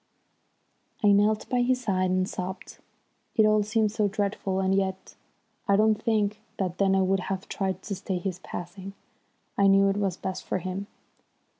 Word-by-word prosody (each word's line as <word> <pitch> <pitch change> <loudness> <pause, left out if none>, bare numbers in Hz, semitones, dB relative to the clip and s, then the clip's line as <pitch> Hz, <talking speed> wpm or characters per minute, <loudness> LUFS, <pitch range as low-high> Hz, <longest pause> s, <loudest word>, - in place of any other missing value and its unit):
I 205 - +6
knelt 210 +2 +3
by 250 -1 +1
his 250 +1 +1
side 185 -5 +1
and 185 0 +1
sobbed. 185 0 -6 0.6
It 220 - +5
all 215 0 +4
seemed 215 0 +1
so 210 -1 +1
dreadful, 200 -1 -1
and 190 0 +1
yet, 190 -1 -1 0.5
I 200 - +4
don't 215 +1 +3
think 215 -2 0 0.2
that 185 -3 -2
then 195 -1 +3
I 190 - +3
would 190 +1 +2
have 190 0 -3
tried 190 -1 -3
to 200 - -4
stay 190 0 -3
his 180 0 -4
passing. 190 +2 -7 0.7
I 200 - +6
knew 195 0 +5
it 195 - 0
was 195 -3 -1
best 190 -1 -4
for - - -2
him. 185 +2 -4
195 Hz, 175 wpm, -27 LUFS, 190-210 Hz, 0.7 s, I